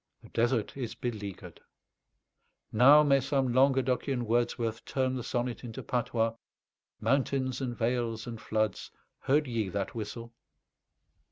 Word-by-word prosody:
The - - -14
desert 115 -1 0
is 125 -4 -4
beleaguered. 105 -5 -6 1.1
Now 140 +7 +7
may 140 -2 +4
some 135 -2 0
Languedocian 130 -1 +2
Wordsworth 115 0 0
turn 130 -1 -1
the 125 - -3
sonnet 120 0 -2
into 115 -2 -7
patois: 115 -2 0 0.7
"Mountains 135 -1 0
and 120 -2 -3
vales 115 -1 -1
and 115 -2 -7
floods, 110 -3 -1 0.4
heard 150 +3 +3
YE 115 -6 -2
that 100 +1 -3
whistle?" 115 +1 -6
120 Hz, 120 wpm, -30 LUFS, 115-130 Hz, 1.1 s, Now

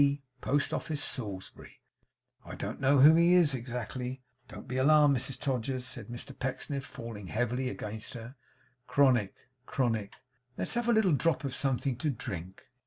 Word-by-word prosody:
Post 145 +1 +1
Office, 155 -3 -2
Salisbury. 100 -7 -5 0.6
I - - -8
don't - - -5
know 135 0 +5
who 150 +3 +9
he 170 +2 +5
is 165 -6 +5
exactly. 125 +1 -5 0.2
Don't - - -10
be 130 +1 -3
alarmed, 145 +1 +5
Mrs 130 +1 0
Todgers,' 130 -1 -2
said 120 -6 -6
Mr 120 +3 -7
Pecksniff, 135 +1 -3
falling 115 -7 -8
heavily 120 +4 -1
against 110 -1 -6
her; 115 +2 -8 0.5
'Chronic 125 -8 +3 0.3
chronic! 115 -6 -1 0.4
Let's - - 0
have 240 0 0
a - - +5
little 215 -5 +4
drop 155 +2 +1
of 135 -2 -3
something 135 -1 0
to 150 +4 -1
drink. 95 - -6
130 Hz, 155 wpm, -30 LUFS, 115-145 Hz, 0.6 s, who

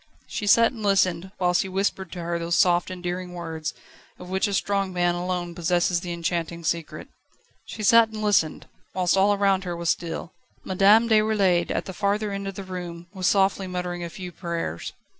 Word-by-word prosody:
She 205 - -4
sat 230 +3 +6
and 235 -4 -10
listened, 190 -3 +1
whilst 180 -1 +2
he 190 - -4
whispered 190 -1 -2
to 175 -2 -6
her 170 0 -2
those 170 0 -1
soft, 175 -3 +3
endearing 180 0 -5
words, 160 -2 -5 0.4
of 180 0 -10
which 190 +3 +1
a 200 - -3
strong 195 -1 0
man 175 -1 +1
alone 175 0 -3
possesses 175 +1 +1
the 175 - -5
enchanting 170 0 -3
secret. 165 0 -3 0.6
She 215 - -7
sat 230 +2 +6
and 215 -1 -6
listened, 200 -7 +1 0.3
whilst 180 -1 +2
all 195 +2 +4
around 195 -2 +2
her 175 -2 -4
was 170 0 +1
still. 170 0 -4 0.3
Madame 200 +5 +4
Déroulède, 210 -6 +3
at - - -2
the 190 - -6
farther 205 +2 0
end 200 0 -4
of 195 - -5
the 195 - -6
room, 175 -2 -7
was 185 -2 -1
softly 195 -1 +2
muttering 180 -1 -4
a 170 - -4
few 180 +1 -8
prayers. 170 - -4
180 Hz, 190 wpm, -25 LUFS, 175-195 Hz, 0.6 s, sat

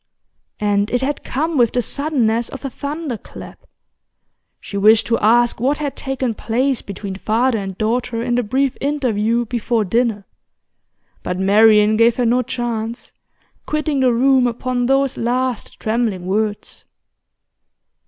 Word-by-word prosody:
And 205 0 +1
it 245 - 0
had 280 +2 -2
come 310 +2 -1
with 235 -2 +3
the 245 - +1
suddenness 240 -6 0
of 275 - -9
a 270 - -4
thunderclap. 285 -3 -7 0.9
She - - -9
wished 215 +2 +5
to 230 - 0
ask 235 +3 +3
what 270 +5 +1
had 290 -2 -4
taken 265 -3 -2
place 250 +4 -1
between 200 0 -7
father 225 +3 +1
and 195 -2 -6
daughter 230 +1 -1
in 240 0 -1
the 245 - +2
brief 260 +4 0
interview 240 -5 0
before 230 -1 -1
dinner; 225 -1 0 1.0
but 180 - -3
Marian 210 +2 +5
gave 230 +1 +4
her 250 - 0
no 245 +2 +3
chance, 235 -1 -4 0.5
quitting 305 -2 -1
the 255 -1 +3
room 255 +1 +3
upon 245 +1 -2
those 270 0 +1
last 250 0 -2
trembling 220 -5 -1
words. 205 +2 -2
240 Hz, 140 wpm, -19 LUFS, 220-260 Hz, 1.0 s, wished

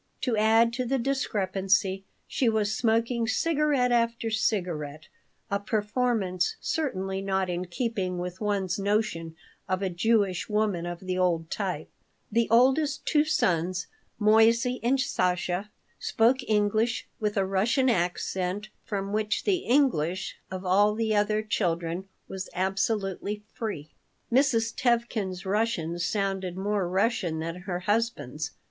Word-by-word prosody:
To 245 -3 +1
add 225 +2 +4
to 250 +1 -2
the 270 +2 +1
discrepancy, 195 -6 0 0.2
she 250 - +1
was 215 -1 +1
smoking 230 0 +1
cigarette 290 0 +2
after 230 -1 +1
cigarette, 170 -9 -2 0.4
a 200 - +1
performance 210 -3 0
certainly 195 -11 -2
not 190 -1 0
in 175 +1 -2
keeping 185 -1 -2
with 180 +2 -5
one's 200 -2 0
notion 200 -5 -1 0.3
of 185 +1 0
a 190 - 0
Jewish 200 0 +1
woman 210 -5 0
of 175 0 -6
the 185 -1 -2
old 170 -3 +1
type 185 -7 -3 0.4
The 230 +1 +2
oldest 270 +5 +3
two 300 0 +3
sons, 180 - +1 0.3
Moissey 230 +3 +4
and 260 +4 +2
Sasha, 180 -3 0 0.3
spoke 245 +4 +2
English 215 +3 +1
with 210 -2 -1
a 195 - +3
Russian 215 +8 +2
accent 185 0 -1
from 200 0 -3
which 215 0 0
the 390 -2 +2
English 195 - +1
of 185 0 -6
all 205 +3 +4
the 220 -1 0
other 210 +1 +2
children 175 -3 -1 0.2
was 190 0 -6
absolutely 195 +2 -1
free. 165 -10 -5 0.4
Mrs. 235 -4 +3
Tevkin's 230 -7 0
Russian 190 -5 0
sounded 190 -1 -1
more 200 -2 -1
Russian 190 -4 +1
than 165 +1 -3
her 180 -1 -2
husband's. 230 +5 -1
205 Hz, 130 wpm, -27 LUFS, 185-230 Hz, 0.4 s, add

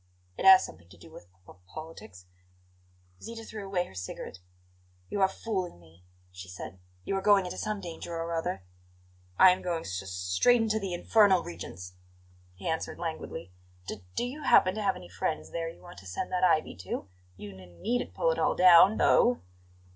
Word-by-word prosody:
"It - - -4
has 190 -1 +9
something 85 -1 -13
to - - -16
do - - -15
with 90 - -14
p 90 - -33
p - - -14
politics." 105 - -11 1.0
Zita 225 0 -8
threw 215 -2 -8
away 190 -2 -1
her - - -15
cigarette. 95 0 -7 0.7
"You 205 - -2
are 190 - +6
fooling 190 - -4
me," 85 +1 -21 0.3
she 90 +1 -10
said. 90 +1 -9 0.2
"You 195 - -2
are - - -2
going 200 -1 +4
into 180 - -6
some 215 -1 -2
danger 170 -1 -7
or 165 0 -3
other." 165 - -3 0.7
"I'm 185 0 +6
going 170 -2 -2
s 95 - -4
s 95 - -9
straight 90 - +2
into 220 -1 +1
the 190 -4 -3
infernal 195 -1 +4
regions," 90 +1 -8 0.6
he 95 - -8
answered 160 0 -2
languidly. 160 - -6 0.3
"D 100 -1 -7
do - - 0
you 270 +5 -6
happen 185 -9 +5
to 215 - -4
have 195 -2 +1
any 90 - -10
friends 100 - -3
there 165 -1 -3
you 165 - -14
want 175 0 -12
to 95 - -13
send 95 - -4
that 185 0 0
ivy 165 -4 +2
to? 95 +1 -5 0.3
You 105 - -8
n 90 -2 -15
needn't 245 +2 -2
pull - - +2
it - - -2
all - - +2
down, 185 +3 +7
though." 245 0 +4
170 Hz, 190 wpm, -29 LUFS, -, 1.0 s, has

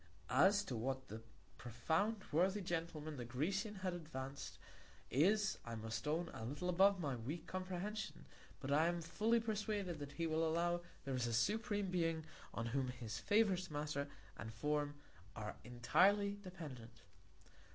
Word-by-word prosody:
As 190 +10 +6
to 125 - -4
what 130 +3 -2
that 110 +1 -6 0.4
profound 160 - 0
worthy 185 +6 +3
Gentleman 165 -4 -3
the 125 - -3
Grecian 195 - -1
has 185 - +1
advanc'd, 140 -5 -5 0.5
is, 195 - +4
I 115 -1 -5
must 110 +4 -4
own, 165 +3 +1
a - - -6
little 145 +10 -2
above 195 +2 +5
my 145 -6 -1
weak 140 +8 -4
Comprehension, 185 +3 -4 0.3
but 135 - -3
I 155 +3 +5
am 170 -1 0
fully 215 +8 +2
persuaded, 210 -6 -1
that 140 -1 -6
he 165 +3 -1
will 160 0 +2
allow 175 +1 +2 0.2
there 135 - -1
is 125 -2 +1
a 115 - -1
supreme 205 - +1
Being 165 -3 +1 0.3
on 115 - -2
whom 130 +3 0
his 120 -3 -4
favourite 205 -4 +3
Matter 145 -1 -2 0.3
and 110 - -6
Form 145 +4 0 0.4
are 105 -1 -5
entirely 200 - +3
dependent. 135 - -8
160 Hz, 150 wpm, -40 LUFS, 130-190 Hz, 0.5 s, As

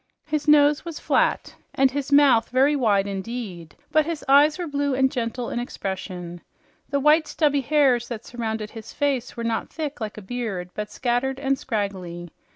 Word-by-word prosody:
His 305 0 -2
nose 295 0 +5
was 335 -3 -6
flat, - - +1 0.2
and 265 -1 +4
his 285 +1 -4
mouth 280 -5 +5
very 270 +4 +3
wide 210 -7 +2
indeed, 195 -4 -6 0.2
but 310 - +4
his 330 -3 -4
eyes 290 +3 +5
were 355 - -3
blue 285 -3 -1
and 265 0 +2
gentle 240 0 -3
in - - -2
expression. 185 -6 -5 0.5
The 280 - 0
white, 300 +2 +4
stubby 290 -3 +1
hairs 265 -4 +2
that 235 -2 -6
surrounded 220 -3 -4
his 225 -1 -10
face 270 -5 -1
were 235 - -3
not 230 -1 -2
thick 300 -5 -5
like 215 -1 -5
a 215 - -8
beard, 195 -5 -4
but 210 0 -5
scattered 260 +2 -1
and 275 -1 +1
scraggly. 190 -8 -4
245 Hz, 175 wpm, -24 LUFS, 215-285 Hz, 0.5 s, nose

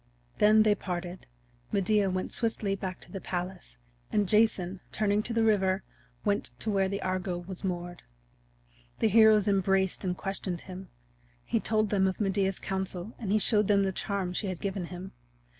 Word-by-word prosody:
Then 215 +1 +6
they 215 -1 +4
parted; 180 -3 -5 0.4
Medea 200 0 +2
went 185 0 -2
swiftly 220 -4 0
back 190 -2 -5
to - - -13
the 195 - -6
palace, 180 - -5 0.3
and 205 -2 +2
Jason, 195 -3 +2
turning 210 -1 +1
to 235 - -6
the 230 0 +2
river, 195 -3 +2 0.4
went 100 - +1
to 215 - -1
where 195 -1 +2
the 200 0 -3
Argo 185 -1 -1
was 180 +2 -8
moored. 175 -2 -4 1.0
The 220 - +2
heroes 215 -1 +6
embraced 195 -1 +2
and 180 -1 -1
questioned 190 -3 -4
him; 185 0 -9 0.6
he - - +1
told 215 -2 0
them 190 -2 +3
of 190 - -2
Medea's 195 -2 +1
counsel 190 +1 -4
and 205 -4 -3
he 215 - +4
showed 210 -1 +2
them 200 -1 +4
the 190 - +1
charm 190 -1 -2
she 200 - -2
had 185 -2 -4
given 195 -2 -3
him. 185 +2 -8
195 Hz, 175 wpm, -29 LUFS, 185-210 Hz, 1.0 s, Then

